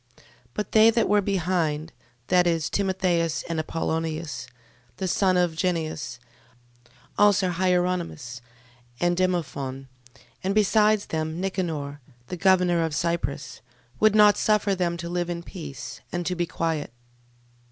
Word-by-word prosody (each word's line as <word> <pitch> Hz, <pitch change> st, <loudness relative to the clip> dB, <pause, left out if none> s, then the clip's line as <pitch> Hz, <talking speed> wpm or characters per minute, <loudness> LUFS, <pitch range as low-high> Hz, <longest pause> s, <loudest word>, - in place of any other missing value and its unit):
12:2. -, -, -22 dB, 0.3 s
But 210 Hz, -, -3 dB
they 220 Hz, +1 st, +7 dB
that 230 Hz, 0 st, +2 dB
were 205 Hz, +1 st, +4 dB
behind, 170 Hz, -5 st, -1 dB, 0.3 s
viz. 170 Hz, -3 st, +2 dB
Timotheus, 185 Hz, -4 st, 0 dB
and 165 Hz, -1 st, -2 dB
Apollonius, 160 Hz, -2 st, -3 dB, 0.5 s
the 190 Hz, -, -2 dB
son 185 Hz, 0 st, +2 dB
of 175 Hz, -2 st, +1 dB
Genneus, 160 Hz, -8 st, -2 dB, 1.0 s
also 200 Hz, -3 st, +4 dB
Hieronymus, 175 Hz, -8 st, -1 dB, 0.6 s
and 175 Hz, 0 st, +2 dB
Demophon, 140 Hz, -7 st, -2 dB, 0.6 s
and 195 Hz, +2 st, 0 dB
besides 215 Hz, 0 st, +3 dB
them 160 Hz, +1 st, -3 dB
Nicanor, 160 Hz, -7 st, -3 dB, 0.3 s
the 180 Hz, -, -3 dB
governor 180 Hz, -2 st, +3 dB
of 160 Hz, -2 st, -2 dB
Cyprus, 140 Hz, -7 st, -2 dB, 0.4 s
would 215 Hz, -1 st, +4 dB
not 210 Hz, -1 st, +6 dB
suffer 210 Hz, -1 st, +2 dB
them 175 Hz, -2 st, -1 dB
to 170 Hz, 0 st, -5 dB
live 175 Hz, 0 st, -2 dB
in 170 Hz, -1 st, -4 dB
peace, 140 Hz, -8 st, -8 dB
and 175 Hz, 0 st, -3 dB
to 180 Hz, -, 0 dB
be 175 Hz, -1 st, -1 dB
quiet. 160 Hz, -5 st, -2 dB
175 Hz, 130 wpm, -25 LUFS, 160-190 Hz, 1.0 s, they